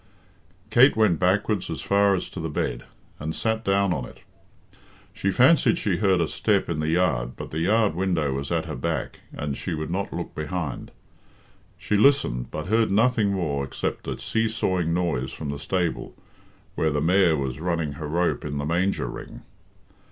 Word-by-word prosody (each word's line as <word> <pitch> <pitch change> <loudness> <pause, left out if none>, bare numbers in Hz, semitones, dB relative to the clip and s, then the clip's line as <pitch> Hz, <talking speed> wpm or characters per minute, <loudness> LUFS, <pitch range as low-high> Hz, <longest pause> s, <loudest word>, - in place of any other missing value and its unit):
Kate 125 +5 +6
went 105 -7 +3
backwards 100 +1 +1
as - - -4
far 100 0 +3
as 90 - -3
to - - -8
the 80 0 -3
bed, - - -3 0.3
and 80 +2 -4
sat 110 0 -1
down 100 -1 +2
on 65 - -3
it - - -14 0.9
She 100 - -1
fancied 130 - +4
she 95 -4 0
heard 95 -3 +3
a 85 - +1
step 95 +6 0
in 80 -2 -2
the 75 - -1
yard, 65 -8 +1
but - - -8
the 80 - -3
yard 105 +4 +2
window 85 -6 0
was 70 +1 -4
at - - 0
her - - -5
back, 65 0 -3
and 70 -1 -4
she 85 +2 -4
would 80 +1 -4
not 100 +2 -2
look - - -5
behind. 75 -2 -4 0.9
She 105 - 0
listened, 100 - +3
but 75 - -5
heard 110 +2 +2
nothing 110 0 +3
more 75 -7 -1
except 65 - -4
a - - -3
see 110 0 0
sawing 95 -6 0
noise 80 -7 -1
from 75 +1 -6
the 70 - -6
stable, 90 +1 -2 0.6
where 80 - +1
the 75 -1 0
mare 85 +1 +3
was 70 -1 -3
running 85 -3 -1
her 75 +1 -6
rope 85 +3 0
in 75 -1 -4
the 70 - -2
manger 90 +5 0
ring. - - -8
85 Hz, 185 wpm, -25 LUFS, 75-100 Hz, 0.9 s, Kate